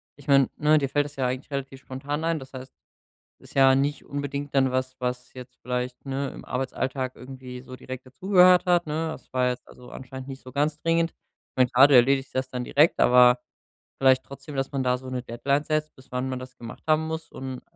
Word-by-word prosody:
ich 145 0 -17
meine, 135 -2 +5
ne, 150 +1 +4
dir 140 -2 -1
fällt 145 +1 +1
es 145 0 -10
ja 130 -2 +1
eigentlich 130 +3 -4
relativ 135 -1 -5
spontan 140 +4 -5
ein. 165 -1 0
Das 130 0 -12
heißt, 130 0 -9 0.7
ist - - -17
ja 135 -1 +6
nicht 140 +2 0
unbedingt 145 0 -4
dann 135 -2 +3
was, 130 0 -2
was 125 0 -4
jetzt 125 -1 -11
vielleicht, 125 +1 -3
ne, 135 0 -2
im - - -11
Arbeitsalltag 130 0 -3
irgendwie 130 -1 -9
so 130 0 -10
direkt 130 0 -8
dazugehört 180 +6 +4
hat, 175 -1 +3
ne? 155 +2 -2
Das 160 - -10
war 125 -1 +2
jetzt 125 - -5
also 125 0 -14
anscheinend 130 0 -9
nicht 135 -1 -9
so 130 - -11
ganz 145 +3 0
dringend. 165 0 +2
Ich - - -52
meine, 130 -1 +3
klar, 130 +3 +7
du 145 - +5
erledigst 135 +2 +4
das 130 0 -1
dann 125 -1 -4
direkt, 150 +6 +3
aber 125 0 +6 0.6
vielleicht 130 -1 +4
trotzdem, 140 +2 -10
dass 135 0 -1
man 135 -1 0
da 125 0 +2
so 130 +1 -11
'ne 125 -1 -4
Deadline 140 +5 -1
setzt, 155 0 -2
bis 130 0 -19
wann 125 +1 -2
man 130 -1 -3
das 130 0 -11
gemacht 115 -1 -10
haben 155 0 +2
muss 160 0 -5
und 130 -1 -6
130 Hz, 225 wpm, -25 LUFS, 130-145 Hz, 0.7 s, klar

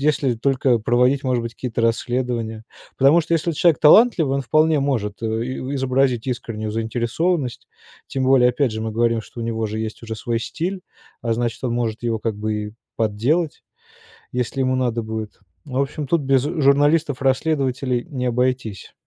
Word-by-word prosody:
если 140 -4 +1
только 130 0 +2
проводить, 125 +5 +2
может 125 -2 +1
быть, 115 -1 -6
какие-то 115 -1 -3
расследования. 115 -1 -1 0.3
Потому 140 +6 +5
что 165 +1 -1
если 165 +1 0
человек 165 0 +3
талантливый, 160 - +6
он 140 - -1
вполне 155 +3 +3
может 115 -7 -2
и - - 0 0.5
изобразить 130 -2 +1
искреннюю 110 -3 -4
заинтересованность, 120 +5 -1 0.4
тем 130 -1 -2
более, 130 -2 +5
опять 125 -2 0
же, 110 - -4
мы 110 - -2
говорим, 115 0 +1
что 120 - -10
у - - -3
него 115 -1 -2
же 110 +1 -4
есть 110 +1 -5
уже 110 -1 -5
свой 115 +1 -2
стиль, 180 +9 -3 0.4
а 115 -1 0
значит, 120 +1 -2
он 120 - 0
может 115 -1 -2
его 115 -2 -1
как 110 -1 -3
бы 110 +1 -2
и 105 0 -4 0.2
подделать, 120 +10 0 0.7
если 125 +2 -2
ему 130 0 +1
надо 120 -3 0
будет. 110 -1 -6 0.3
В 130 -2 -5
общем, 140 +1 -2
тут 165 +2 +2
без 135 -1 +3
журналистов-расследователей 140 -3 +1
не 130 -4 -4
обойтись. 125 -4 -1
125 Hz, 165 wpm, -21 LUFS, 115-140 Hz, 0.7 s, талантливый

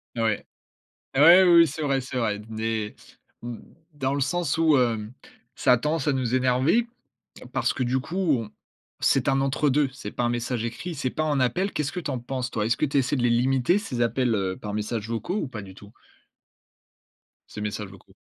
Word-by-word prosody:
Ouais. 115 -3 0 0.7
Ah 135 - +4
ouais, 175 +4 +9
oui, 180 - +5
oui. 165 - +7
C'est 155 +2 -5
vrai, 135 -2 +1
c'est 130 0 -7
vrai. 105 -4 0
Des, 110 -1 -3 0.5
mmh, 120 -1 -6 0.4
dans 135 -1 -1
le 140 - -1
sens 160 +2 0
où, 160 -2 +4
hem, 115 -2 0 0.4
ça 130 - +3
a 125 - +5
tendance 150 +3 -1
à 145 - +3
nous 130 -2 -1
énerver. 130 - +2 0.7
Parce - - 0
que, 130 - -2
du 130 +1 0
coup, 160 +8 -7 0.2
on 110 -2 -8 0.5
c'est 135 0 +2
un 135 0 +2
entre 135 +2 +1
2. 140 0 +2
C'est 105 -6 -7
pas - - -3
un 120 - +1
message 120 -1 -2
écrit, 120 +10 -5
c'est 135 -4 -2
pas 155 - -2
un 145 -3 0
appel. 175 - +1
Qu'est-ce 150 0 -2
que 180 - -4
tu 155 -4 -4
en 130 - -2
penses 125 +1 -4
toi? 105 -4 -1
Est-ce 115 +2 0
que 150 - +2
tu 140 - -3
essaies 140 +1 +2
de 125 - -1
les 120 - +3
limiter 130 +7 +2
ces 200 - -3
appels, 120 0 +1
heu, 95 -2 -1
par 105 - -6
messages 105 +1 -3
vocaux 115 - -3
ou 155 -10 -2
pas 110 -5 -7
du 95 -1 -11
tout? 100 +2 -15 1.6
Ces 105 - -7
messages 105 -1 -4
vocaux. 95 - -17
130 Hz, 215 wpm, -25 LUFS, 115-145 Hz, 1.6 s, ouais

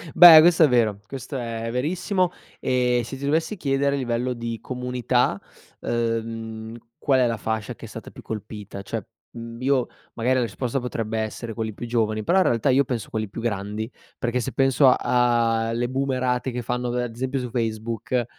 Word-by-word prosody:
Beh, 170 -2 +11
questo 170 0 +5
è - - +7
vero. 115 -6 +2
Questo 135 +2 -6
è 115 -2 -4
verissimo. 180 - 0 0.3
Ehm, 125 -1 +1
se 135 +4 -7
ti 140 - -5
dovessi 160 +8 +1
chiedere 140 -4 +1
a - - -2
livello 125 -1 -1
di 115 -1 -5
comunità, 125 -3 0 0.4
uhm, 115 -1 -3 0.2
qual 135 -2 +2
è 125 - +4
la 115 -1 -1
fascia 110 -1 -3
che - - -11
è - - -8
stata - - -9
più - - -13
colpita? 105 -2 -7
Cioè, 110 +2 -5 0.3
mhmm, 115 0 -8
io 130 -1 +2 0.3
magari 125 +3 +1
la - - +2
risposta 120 +3 -2
potrebbe 115 -3 -3
essere 110 +1 -4
quelli 110 -1 -3
più 120 - -7
giovani, 110 -2 0
però 180 - +3
in 185 - +3
realtà 115 +3 +2
io 135 +2 +5
penso 125 -5 -4
a - - -18
quelli 110 -2 -2
più 115 - -6
grandi. 110 +1 -3 0.3
Perché 120 +1 -1
se 125 +2 -3
penso 135 +1 +4
a 120 -3 +3
a - - -1
le 120 +1 -1
boomerate 130 -1 -1
che 125 0 -3
fanno 125 +1 -2
da 125 0 -1
ad 120 -2 -5
esempio 130 +3 -2
su 125 -2 -5
Facebook 115 +1 -2
120 Hz, 195 wpm, -24 LUFS, 115-130 Hz, 0.4 s, Beh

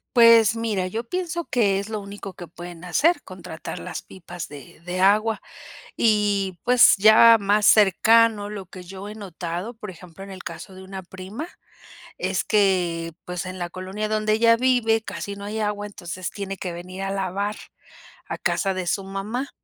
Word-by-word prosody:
Pues 230 -2 +7
mira 215 -5 -1
yo 225 +5 -4
pienso 345 +4 -3
que 205 -10 +1
es 200 +2 -4
lo 215 -1 -3
único 200 -1 -9
que 175 - -9
pueden 175 +1 -10
hacer 295 - +2
contratar 180 -3 -8
las - - -6
pipas 175 -2 -9
de 140 -4 -12
de 180 +1 -3
agua 210 +3 +3 0.6
y 205 -4 +1
pues 250 0 +7
ya 220 +3 +8
más 205 +1 +2
cercano 215 +1 +5
lo 200 -3 -7
que 185 +1 -11
yo 190 +3 -9
he 210 - -8
notado 185 +1 -6
por 210 -2 -9
ejemplo 180 +1 -11
en 195 - -10
el 185 -1 -9
caso 170 +3 -8
de 190 - -11
una 190 0 -8
prima 190 - -7 0.7
es - - -1
que, 180 -5 +1
pues 180 0 -4
en 185 0 -6
la 175 -1 -4
colonia 190 +4 -4
donde 215 0 +1
ella 230 +1 +5
vive 230 -3 +2
casi 200 -2 -6
no 200 - -10
hay 215 +2 -4
agua 210 -1 -2
entonces 180 -2 -6
tiene 195 -1 -5
que 180 -1 -5
venir 185 +2 -7
a 195 - -2
lavar 195 +2 -2 0.7
a - - -4
casa 195 -1 0
de 185 -2 -3
su 195 - -1
mamá 210 +8 -4
200 Hz, 180 wpm, -23 LUFS, 185-220 Hz, 0.7 s, ya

